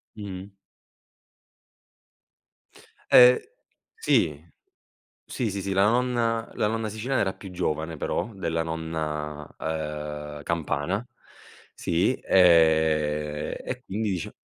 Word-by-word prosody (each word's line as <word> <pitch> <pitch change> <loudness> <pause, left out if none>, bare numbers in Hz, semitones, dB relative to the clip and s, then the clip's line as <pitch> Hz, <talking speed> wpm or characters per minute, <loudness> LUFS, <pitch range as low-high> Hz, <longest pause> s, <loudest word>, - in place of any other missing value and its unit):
Mh-mh. 100 -2 -7 2.6
Eh, 125 - +7 0.5
sì. 455 - +1 0.7
Sì, 120 -4 -2
sì, 100 0 -3
sì. 95 +1 -3
La 95 +1 +4
nonna 120 -1 +1
la - - +1
nonna 110 0 -2
siciliana 120 +5 -1
era 95 -2 0
più 95 - -11
giovane, 80 -2 -2
però, 110 - -2
della 85 -4 -2
nonna, 75 -2 -4
ehm, 75 -1 -5
campana. 85 +6 -1 0.7
Sì, 85 +9 +1
ehm, 80 -4 +3
e 125 0 -5
quindi, 105 +1 -2
dice, 90 -4 -4
85 Hz, 100 wpm, -26 LUFS, 75-105 Hz, 2.6 s, Eh